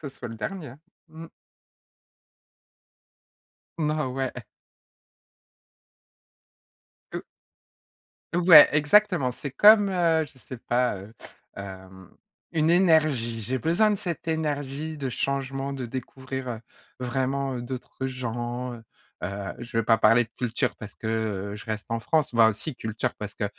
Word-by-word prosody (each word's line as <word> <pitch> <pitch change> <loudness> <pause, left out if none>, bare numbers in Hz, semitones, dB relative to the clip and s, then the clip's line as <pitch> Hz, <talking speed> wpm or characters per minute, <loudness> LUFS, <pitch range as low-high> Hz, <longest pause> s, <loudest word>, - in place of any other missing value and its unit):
ce 145 - -6
soit 120 - -7
le 115 - -7
dernier, 165 - -5
hein. 135 +5 -14 0.3
Mmh. 160 +1 -10 2.5
Non, 150 -4 -1
ouais. 135 -1 -2 2.8
Heu - - -5 1.1
Ouais, 170 -4 +9
exactement, 155 -2 +4
c'est 140 +2 -7
comme, 205 +6 +7
heu, 165 -4 +2
je 145 -2 -19
sais 130 0 -9
pas, 120 -2 0
heu, 100 +4 -11 0.4
hem, 95 -2 -10 0.4
une 160 -1 +2
énergie. 155 -10 +3
J'ai 130 +5 -2
besoin 190 - +3
de - - +1
cette 175 -4 -5
énergie, 150 -1 -2
de 135 -2 -3
changement, 135 +1 -2
de 130 -3 -4
découvrir, 130 +1 -6
heu, 115 -2 -4 0.4
vraiment 130 +1 -1
d'autres 130 +1 -5
gens, 120 0 -4
heu. 115 -1 -11 0.4
Heu, 100 +1 -4
je 120 -1 -5
vais 115 - +2
pas 115 0 +4
parler 115 +3 +5
de 110 - -27
culture 125 0 -1
parce 105 -2 -10
que, 110 - -6
heu, 105 -3 -2
je 100 - -9
reste 110 -1 -4
en 115 0 -2
France. 150 +1 +1
Bah, 110 -1 +6
si, 130 +7 -6
culture 110 -2 -3
parce 105 -1 -7
que 105 - -2
130 Hz, 135 wpm, -26 LUFS, 115-155 Hz, 2.8 s, Ouais